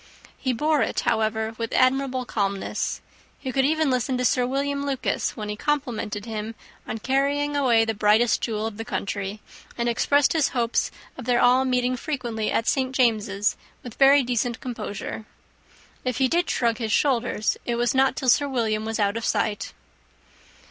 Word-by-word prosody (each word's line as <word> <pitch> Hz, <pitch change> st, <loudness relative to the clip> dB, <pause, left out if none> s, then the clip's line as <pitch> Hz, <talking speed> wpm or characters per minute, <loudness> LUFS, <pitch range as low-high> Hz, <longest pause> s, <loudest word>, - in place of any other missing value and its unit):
He 260 Hz, -, 0 dB
bore 300 Hz, +4 st, +1 dB
it, -, -, 0 dB
however, 220 Hz, 0 st, 0 dB
with 230 Hz, -1 st, -3 dB
admirable 255 Hz, 0 st, +2 dB
calmness. 200 Hz, -4 st, -2 dB, 0.4 s
He 260 Hz, -, -5 dB
could 265 Hz, +1 st, +2 dB
even 310 Hz, -1 st, +2 dB
listen 255 Hz, +1 st, 0 dB
to 250 Hz, -, 0 dB
Sir 250 Hz, 0 st, +2 dB
William 280 Hz, +2 st, -1 dB
Lucas, 270 Hz, -2 st, -2 dB
when 210 Hz, -1 st, -4 dB
he 210 Hz, -, -3 dB
complimented 230 Hz, -6 st, -2 dB
him 220 Hz, 0 st, -5 dB, 0.3 s
on -, -, -3 dB
carrying 280 Hz, +4 st, 0 dB
away 240 Hz, -5 st, +3 dB
the 225 Hz, -, -1 dB
brightest 215 Hz, +3 st, +3 dB
jewel 215 Hz, -1 st, -2 dB
of 220 Hz, -2 st, -5 dB
the 225 Hz, -, -4 dB
country, 200 Hz, -1 st, -4 dB, 0.4 s
and 235 Hz, 0 st, -1 dB
expressed 280 Hz, +4 st, +3 dB
his 315 Hz, -4 st, +2 dB
hopes 235 Hz, 0 st, +1 dB, 0.3 s
of 250 Hz, -, -7 dB
their 245 Hz, -1 st, +2 dB
all 250 Hz, +2 st, +4 dB
meeting 250 Hz, 0 st, +1 dB
frequently 240 Hz, -5 st, -3 dB
at 230 Hz, -, 0 dB
St. 260 Hz, 0 st, 0 dB
James's, 210 Hz, -5 st, +1 dB, 0.3 s
with 245 Hz, -, -8 dB
very 275 Hz, +2 st, +6 dB
decent 240 Hz, -1 st, -1 dB
composure. 220 Hz, -3 st, -6 dB, 0.8 s
If 250 Hz, -2 st, -2 dB
he 265 Hz, 0 st, +3 dB
did 345 Hz, +6 st, +1 dB
shrug 235 Hz, -1 st, +1 dB
his 220 Hz, -2 st, -2 dB
shoulders, 245 Hz, -6 st, +1 dB
it 240 Hz, -, 0 dB
was 240 Hz, 0 st, +1 dB
not 265 Hz, 0 st, +3 dB
till 260 Hz, -, 0 dB
Sir 285 Hz, +4 st, +4 dB
William 220 Hz, -4 st, -1 dB
was 225 Hz, 0 st, -3 dB
out 205 Hz, +1 st, +1 dB
of 230 Hz, -, -4 dB
sight. 215 Hz, -1 st, -1 dB
245 Hz, 175 wpm, -24 LUFS, 220-265 Hz, 0.8 s, very